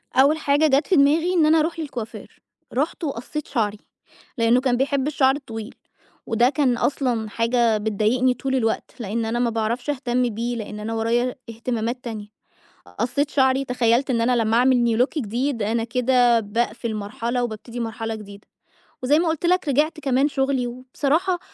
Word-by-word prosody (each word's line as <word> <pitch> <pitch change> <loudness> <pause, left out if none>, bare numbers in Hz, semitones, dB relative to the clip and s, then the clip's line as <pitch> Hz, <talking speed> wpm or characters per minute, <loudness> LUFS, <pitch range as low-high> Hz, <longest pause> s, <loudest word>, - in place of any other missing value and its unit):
أول 280 +4 +5
حاجة 295 +1 +2
جات 280 +2 +2
في 380 - +3
دماغي 320 +5 +3
إن 335 -4 +4
أنا 315 +1 +5
أروح 325 +2 -1
للكوافير، 250 -8 -7 0.3
رُحت 295 +6 -1
وقصّيت 280 +2 -4
شعري، 215 -4 -1 0.6
لإنّه 235 +2 +3
كان 255 -2 +1
بيحب 275 +1 0
الشعر 270 -2 +3
الطويل، 225 -6 -8 0.5
وده 235 +2 +3
كان 270 -5 +1
أصلًا 240 -5 -1
حاجة 230 0 +2
بتضايقني 220 +4 +1
طول 265 +2 -2
الوقت، 225 -3 -1
لإن 225 +1 -2
أنا 230 +2 -1
ما 240 -1 +2
باعرفش 230 +4 -2
أهتم 250 -3 0
بيه، 235 +3 -3
لإن 210 -1 -6
أنا 225 +2 -4
ورايا 235 +3 0
اهتمامات 235 +1 -3
تانية. 220 -3 -6 0.7
قصّيت 285 +3 0
شعري، 265 0 +2
تخيلّت 250 +1 +1
إن 235 - +1
أنا 245 +1 +2
لمّا 220 +1 +1
أعمل 245 -2 +3
new - - -1
look 295 +4 -1
جديد، 240 +1 -2
أنا 225 +2 0
كده 245 0 +3
باقفل 225 +1 -2
مرحلة 235 +4 -2
وبابتدي 235 +1 -6
مرحلة 225 0 -3
جديدة. 205 -2 -11 0.5
وزي 290 +4 +3
ما 335 0 +1
قُلت 320 +1 -1
لك 360 -3 +2
رجعت 305 +4 +1
كمان 270 0 +2
شُغلي 270 -3 0
وبصراحة 280 +9 -1
245 Hz, 165 wpm, -22 LUFS, 230-275 Hz, 0.7 s, أول